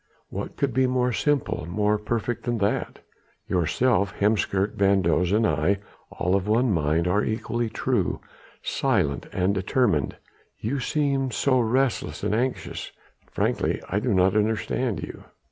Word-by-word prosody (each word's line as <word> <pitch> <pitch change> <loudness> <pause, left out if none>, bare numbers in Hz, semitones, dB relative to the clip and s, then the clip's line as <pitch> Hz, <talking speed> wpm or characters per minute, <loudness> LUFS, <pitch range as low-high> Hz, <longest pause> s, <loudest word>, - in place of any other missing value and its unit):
What - - -6
could 140 -3 0
be 130 +1 +3
more 125 -1 +1
simple, 140 - 0
more 105 +3 +1
perfect 115 +2 -2
than 120 -1 0
that? 100 -1 -1 0.5
Yourself, 100 +4 +1
Heemskerk, 100 -1 +1
van 100 -2 +3
Does 85 +2 +2
and 110 +2 +3
I... 80 +5 +2 0.3
all 90 - -1
of 100 0 0
one 115 +3 +3
mind... 80 0 +1
all 100 +4 +2
equally 115 +1 -2
true, 115 -3 0 0.4
silent 70 -2 0
and 95 +1 +1
determined.... 95 - +1 0.4
You 130 +6 -2
seem 135 0 0
so 130 +2 +2
restless 125 +2 0
and - - 0
anxious.... 125 +4 -2 0.4
Frankly - - 0
I 100 - +1
do 120 +3 -1
not 95 0 +3
understand 110 - 0
you." - - -8
105 Hz, 145 wpm, -25 LUFS, 95-125 Hz, 0.5 s, be